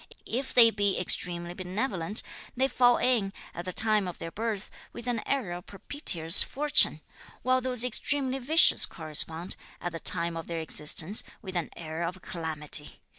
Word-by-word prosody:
If 260 +3 -4
they 230 -2 +7
be 200 -2 0
extremely 175 -1 -1
benevolent, 185 +1 -2 0.3
they 265 +1 +2
fall 245 -2 +3
in, 225 -6 0 0.2
at 175 - -8
the 185 - -4
time 215 0 +2
of 180 - -7
their 165 - -8
birth, 215 -1 -4 0.2
with 235 - -9
an 240 -3 -2
era 195 -11 -2
of 180 - -20
propitious 190 - +3
fortune; 295 +2 +1 0.4
while 255 0 +1
those 250 -2 0
extremely 265 +2 0
vicious 310 +6 +6
correspond, 160 +2 0 0.2
at 175 - -5
the 165 - -7
time 170 +1 -1
of 165 - -7
their 170 - -5
existence, 160 +4 +1 0.2
with 190 -2 -8
an 170 -3 -3
era 165 +1 -5
of 180 +2 -7
calamity. 155 -3 0
190 Hz, 165 wpm, -27 LUFS, 170-245 Hz, 0.4 s, they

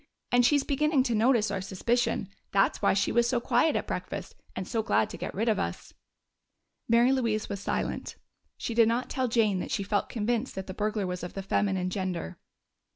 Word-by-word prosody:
And 245 0 +5
she's 285 +3 +4
beginning 290 -1 +2
to 245 -3 -1
notice 225 -1 +3
our 195 -2 -2
suspicion. 225 +3 0 0.2
That's 195 0 +2
why - - +3
she 200 - +1
was 235 0 +3
so 245 -2 +1
quiet 245 +6 +2
at - - -1
breakfast - - -5 0.2
and 185 - -4
so 225 - 0
glad 110 - +1
to - - -7
get - - -5
rid 220 +5 -1
of 220 - +2
us." 85 - -4 1.0
Mary 235 +2 +5
Louise 230 -5 0
was 200 -1 -3
silent; - - -3 0.4
she 235 - -4
did 230 -1 +5
not 235 +2 -1
tell 260 -1 0
Jane 220 -5 +2
that - - -4
she 200 - -1
felt 205 +1 -1
convinced 235 +2 -1
that 190 - -4
the 185 - -6
burglar 210 0 -1
was 180 0 -4
of 175 - -7
the 195 - -4
feminine 190 -2 0
gender. 185 - -3
220 Hz, 205 wpm, -28 LUFS, 195-240 Hz, 1.0 s, And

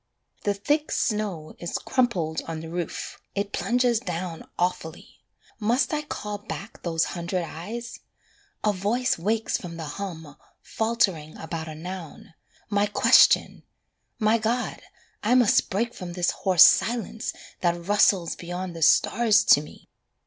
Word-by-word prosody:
The 205 -1 +1
thick 290 +9 0
snow 205 -8 -1
is 170 - -3
crumpled 185 -12 0
on 160 -1 -4
the 165 - -8
roof, 175 -2 -5
it 200 0 -2
plunges 245 -1 +1
down 175 -3 -5
Awfully. 175 -2 -3 0.4
Must 235 +8 +1
I 300 - 0
call 210 -8 -5
back 195 0 -8
those 165 -2 0
hundred 175 +1 -2
eyes? 215 +9 -7 0.6
A 210 - +2
voice 215 +4 0
Wakes 215 +5 0
from 170 -3 -8
the 165 - -5
hum, 160 -2 -7 0.3
faltering 195 -9 -1
about 160 0 -5
a 155 - -7
noun 175 0 -8 0.3
My 205 0 +1
question! 235 +3 +5 0.6
My 220 +1 +3
God, 235 +3 -2 0.4
I 230 +4 +3
must 245 -5 +4
break 235 +5 -1
from 175 -1 -7
this 175 0 +1
hoarse 185 -3 +5
silence 230 0 +1 0.3
That 175 -1 0
rustles 195 -3 +3
beyond 175 0 -6
the 165 - -7
stars 220 +6 +4
to 145 - +6
me. 150 - -14
190 Hz, 140 wpm, -25 LUFS, 170-225 Hz, 0.6 s, to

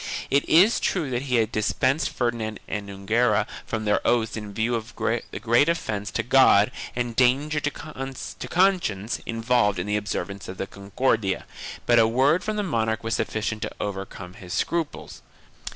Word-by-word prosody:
It 140 +1 +2
is 190 +8 +6
true 160 -8 -1
that 120 0 -1
he 130 -2 -1
had 115 -1 +2
dispensed 130 +7 +1
Ferdinand 115 -3 -2
and 100 -1 -4
Enguera 105 +2 +1 0.2
from 110 -1 -3
their 105 - +2
oaths 115 -2 +1
in 105 -2 -6
view 115 +4 -1
of 115 -1 -4
the 115 +1 -2
great 120 +7 +3
offence 105 -11 -2
to - - -2
God 125 -4 +5 0.2
and 120 -1 -2
danger 135 +5 +3
to 145 - -1
conscience 140 - -1
involved 115 -3 +1
in 90 - -2
the 105 0 0
observance 100 -1 -4
of 95 - -7
the - - -2
Concordia, 100 +1 -1 0.4
but 120 -1 +5
a 110 - +5
word 135 - +3
from 215 0 -2
the 210 - -1
monarch 110 - -1
was 115 0 -2
sufficient 110 0 -2
to - - -2
overcome 95 -2 -5
his 90 -4 -9
scruples. 165 -3 -3
115 Hz, 170 wpm, -25 LUFS, 105-135 Hz, 0.4 s, is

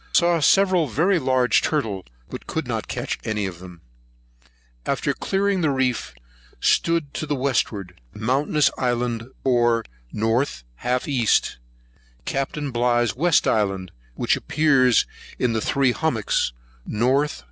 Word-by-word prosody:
Saw 170 -1 +4
several 185 +1 +4
very 165 - +2
large 130 -4 +2
turtle, 110 - -2 0.2
but - - -9
could - - -3
not - - -3
catch - - -3
any 105 -2 -2
of 90 -3 -6
them. 90 -2 -12 1.0
After - - -1
clearing 195 -1 0
the 155 - +2
reef, 130 - -1 0.4
stood 165 -4 +1
to 155 - -4
the 145 - 0
westward. 110 - -2
Mountainous 135 +7 +1
Island 120 -1 -1
bore 120 -3 +2 0.3
N. 115 +4 +1 0.3
half 125 +1 -1
E.; 125 -6 0 1.0
Capt. 135 0 -3
Bligh's 120 -2 +1
west 170 +6 +3
island, 95 -4 0 0.2
which - - +1
appears 135 -6 +3 0.3
in 115 -3 0
Three 135 +1 +2
Hummocks, 120 - 0 0.4
N.N. 130 +7 +2
125 Hz, 125 wpm, -23 LUFS, 115-150 Hz, 1.0 s, Saw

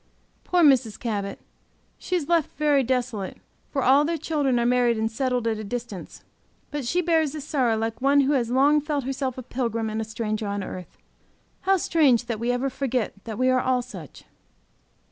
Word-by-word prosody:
Poor 355 -1 +2
Mrs. 255 -7 +4
Cabot! 205 -4 -3 0.6
She 365 - -2
is 320 -5 -1
left 335 -5 +1
very 295 -2 +3
desolate, 245 -6 -2 0.3
for 275 -3 -1
all 275 +3 +5
their 330 +2 -1
children 290 -5 0
are 235 - +1
married 245 -1 +3
and 220 +1 -1
settled 250 0 -1
at 220 -1 0
a - - -5
distance. 230 -3 -6 0.5
But 290 -4 -3
she 350 +8 +1
bears 320 -4 +2
this 300 -2 -6
sorrow 250 -7 +1
like 225 +2 -3
one 280 +1 +4
who 275 +2 +2
has 240 -4 +1
long 280 +4 +4
felt 295 -2 -2
herself 265 0 -3
a 255 - -6
pilgrim 230 -3 -2
and 220 +1 -2
a - - -1
stranger 220 -1 -3
on 200 0 -2
earth. 185 -1 -8 0.7
How 390 - +6
strange 285 -9 +3
that 230 -2 -3
we 235 +2 0
ever 245 +2 0
forget 255 -3 -1
that 220 -2 -5
we 255 +1 +2
are 255 0 +3
all 255 -1 +1
such! 250 - -11
250 Hz, 195 wpm, -25 LUFS, 225-285 Hz, 0.7 s, How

